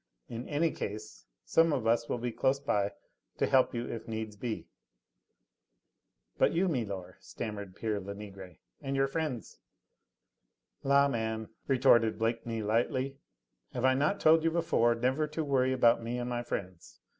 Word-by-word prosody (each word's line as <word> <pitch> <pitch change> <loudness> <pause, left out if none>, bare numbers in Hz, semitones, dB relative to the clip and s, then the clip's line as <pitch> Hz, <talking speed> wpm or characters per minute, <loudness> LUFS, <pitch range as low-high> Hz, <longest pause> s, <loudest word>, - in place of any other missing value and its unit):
In 115 +1 -6
any 155 +2 +2
case 105 +1 -7 0.2
some 165 0 +4
of 130 -6 -1
us 115 +1 +2
will - - 0
be 120 0 -3
close 130 +4 +1
by 100 -7 0 0.4
to - - +2
help 130 -2 +3
you 120 0 -2
if 115 - -6
needs 110 -1 -4
be." 110 +1 -4 1.7
"But - - +4
you, 185 +3 +2
milor," 100 - -3
stammered 100 -4 -6
pere 110 -2 -2
Lenegre, 100 -2 -9 0.2
"and 135 0 -3
your 135 0 +3
friends 135 -4 -4 0.6
?" - - -50
"La, 140 0 +6
man," 110 -3 -2 0.2
retorted 120 -5 +4
Blakeney 115 0 -1
lightly, 130 +5 0 0.5
"have 125 - -1
I 130 - +5
not 150 +9 +1
told 160 0 +5
you 165 - +3
before 160 -8 +2
never 130 +6 +1
to 155 +1 -3
worry 130 -3 +2
about 120 -3 +4
me 115 +2 -3
and 120 0 -3
my 120 0 -1
friends? 95 -7 -6
120 Hz, 155 wpm, -31 LUFS, 110-135 Hz, 1.7 s, La